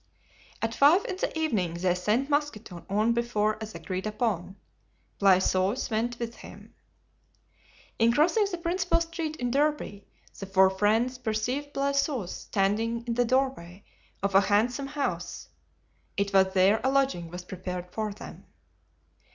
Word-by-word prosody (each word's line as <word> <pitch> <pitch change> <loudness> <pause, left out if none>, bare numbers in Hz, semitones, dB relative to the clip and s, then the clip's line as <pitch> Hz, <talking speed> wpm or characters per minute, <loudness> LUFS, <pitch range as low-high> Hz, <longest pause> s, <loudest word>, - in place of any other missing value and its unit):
At 225 0 0
five 300 +10 +5
in 375 - -4
the 345 - -2
evening 210 - 0
they 180 +1 +1
sent 210 +9 0
Mousqueton 260 - -2
on 215 +4 +2
before 215 -3 0
as 220 -3 -7
agreed 185 +4 -4
upon. 205 -4 -2 0.6
Blaisois 190 +4 +2
went 230 +2 -1
with 235 -1 -5
him. - - -13 1.3
In 230 +1 +5
crossing 350 - +3
the 355 - -4
principal 345 +1 0
street 330 -2 -4
in 245 -4 -2
Derby 285 -7 -1 0.3
the 195 - -6
four 190 0 +5
friends 225 +6 +1
perceived 250 +5 -2
Blaisois 275 - 0
standing 225 +4 -1
in 235 - -1
the 245 +1 +2
doorway 235 -8 -1 0.4
of 200 0 0
a 195 - +7
handsome 235 +7 +1
house. 285 0 -4 0.7
It 200 0 -1
was 190 -1 +4
there 195 +4 +4
a 260 - +3
lodging 265 -11 +1
was 180 +1 -7
prepared 180 -1 -6
for 215 +1 -3
them. 200 - -11
225 Hz, 145 wpm, -27 LUFS, 195-275 Hz, 1.3 s, a